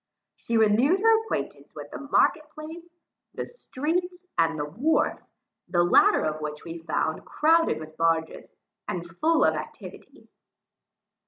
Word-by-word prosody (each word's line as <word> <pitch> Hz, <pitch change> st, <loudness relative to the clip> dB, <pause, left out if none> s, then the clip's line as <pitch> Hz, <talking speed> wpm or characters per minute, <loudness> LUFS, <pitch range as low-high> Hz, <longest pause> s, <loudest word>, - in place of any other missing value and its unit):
She 230 Hz, -, -2 dB
renewed 225 Hz, -, +4 dB
her 450 Hz, +1 st, +4 dB
acquaintance 445 Hz, -, -5 dB
with -, -, -9 dB
the -, -, -7 dB
market 300 Hz, +2 st, +1 dB
place, 320 Hz, +3 st, -10 dB, 0.5 s
the -, -, -3 dB
streets, 355 Hz, -, -4 dB
and 165 Hz, -1 st, +2 dB
the 145 Hz, -, -2 dB
wharf, 245 Hz, -, 0 dB, 0.5 s
the 175 Hz, -1 st, +2 dB
latter 175 Hz, -, +5 dB
of 155 Hz, 0 st, -2 dB
which 150 Hz, 0 st, -5 dB
we 165 Hz, 0 st, -7 dB
found 160 Hz, -1 st, -2 dB
crowded 330 Hz, +2 st, +2 dB
with 155 Hz, 0 st, -11 dB
barges, 165 Hz, -1 st, 0 dB, 0.4 s
and 175 Hz, -1 st, -4 dB
full 310 Hz, -, +1 dB
of -, -, +3 dB
activity. -, -, -9 dB
230 Hz, 140 wpm, -26 LUFS, -, 0.5 s, latter